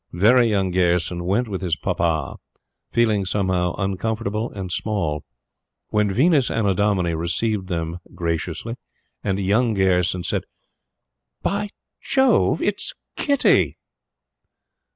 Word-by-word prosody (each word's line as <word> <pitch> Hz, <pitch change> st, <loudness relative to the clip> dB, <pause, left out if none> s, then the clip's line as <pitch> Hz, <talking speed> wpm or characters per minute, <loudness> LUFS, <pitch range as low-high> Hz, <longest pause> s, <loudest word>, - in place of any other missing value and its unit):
"Very 115 Hz, +7 st, +5 dB
Young" 95 Hz, -3 st, +1 dB
Gayerson 90 Hz, -1 st, +1 dB
went 105 Hz, +7 st, +1 dB
with 95 Hz, -3 st, -4 dB
his 90 Hz, -4 st, 0 dB
papa, 80 Hz, -3 st, -1 dB, 0.5 s
feeling, 110 Hz, -4 st, +2 dB
somehow, 95 Hz, -2 st, 0 dB
uncomfortable 105 Hz, +3 st, -2 dB
and 95 Hz, -3 st, -6 dB
small. 85 Hz, -8 st, -1 dB, 0.7 s
The 105 Hz, 0 st, +3 dB
Venus 135 Hz, -, +3 dB
Annodomini 100 Hz, -4 st, +1 dB
received 95 Hz, +5 st, -1 dB
them 85 Hz, -1 st, -3 dB, 0.2 s
graciously 85 Hz, +7 st, -3 dB, 0.5 s
and 95 Hz, -1 st, 0 dB
"Young" 110 Hz, +4 st, +2 dB
Gayerson 90 Hz, -2 st, +2 dB
said: -, -, -1 dB, 1.0 s
"By 205 Hz, +1 st, -1 dB, 0.3 s
Jove! 265 Hz, -1 st, +3 dB
It's -, -, -1 dB, 0.2 s
Kitty!" 280 Hz, -2 st, +2 dB
95 Hz, 105 wpm, -22 LUFS, 90-110 Hz, 1.0 s, Very